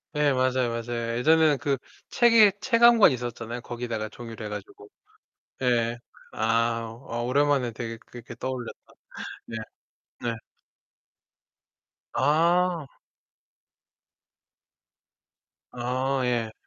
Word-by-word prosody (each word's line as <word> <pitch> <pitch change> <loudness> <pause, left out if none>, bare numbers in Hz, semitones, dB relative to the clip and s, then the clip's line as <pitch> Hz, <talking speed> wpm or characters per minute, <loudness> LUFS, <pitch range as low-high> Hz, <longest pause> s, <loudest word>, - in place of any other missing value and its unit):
예 150 -1 +3
맞아요, 130 -1 +1
맞아요. 115 0 -3
예전에는 155 +2 +4
그 140 -2 0 0.3
책에 230 -4 +6
책 235 0 +1
한 235 0 +8
권 210 - +7
있었잖아요. 120 -1 -5
거기다가 120 -3 -4
종이로 115 -1 -9
해 - - -5
가지고. 105 0 -9 0.7
예예. 120 -2 +1 0.3
아, 115 0 0
아 115 +1 -3
오랜만에 135 -1 +2
되게 115 0 -6
그렇게 120 0 -12
떠올렸다. 130 -1 -4 0.7
네. 115 - -6 0.6
네. 120 -1 -2 1.8
아. 170 +3 +2 2.9
아 130 +2 -1
예. 115 -3 0
120 Hz, 200 characters per minute, -26 LUFS, 115-145 Hz, 2.9 s, 한